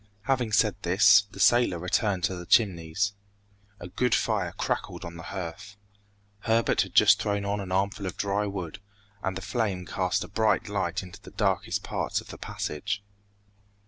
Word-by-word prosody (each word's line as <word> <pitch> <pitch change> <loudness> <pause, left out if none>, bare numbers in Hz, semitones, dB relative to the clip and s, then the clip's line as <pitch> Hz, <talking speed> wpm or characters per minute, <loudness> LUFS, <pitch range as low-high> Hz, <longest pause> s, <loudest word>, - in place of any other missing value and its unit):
Having 120 -2 0
said 105 -1 +3
this, 95 +2 +6
the 100 - -12
sailor 120 -3 +4
returned 90 +2 0
to 95 - +1
the 90 -1 -8
Chimneys. 95 -1 +2 0.7
A 90 - -7
good 125 +7 +1
fire - - 0
crackled - - -3
on 85 0 -8
the 85 - -8
hearth. 95 +2 -7 0.6
Herbert 115 +2 +2
had - - -5
just - - +6
thrown 100 -1 -1
on 100 +1 -1
an 95 -2 -6
armful 100 +1 0
of 90 - -6
dry 100 +1 0
wood, 90 -5 -5 0.4
and 95 -1 -2
the 95 - -7
flame 100 -4 -2
cast 90 0 -1
a - - -8
bright 110 0 +1
light 95 -3 -2
into 90 -2 -12
the - - -12
darkest - - -1
parts - - -2
of - - -13
the - - -9
passage. 100 +6 -4
100 Hz, 175 wpm, -27 LUFS, 90-105 Hz, 0.7 s, this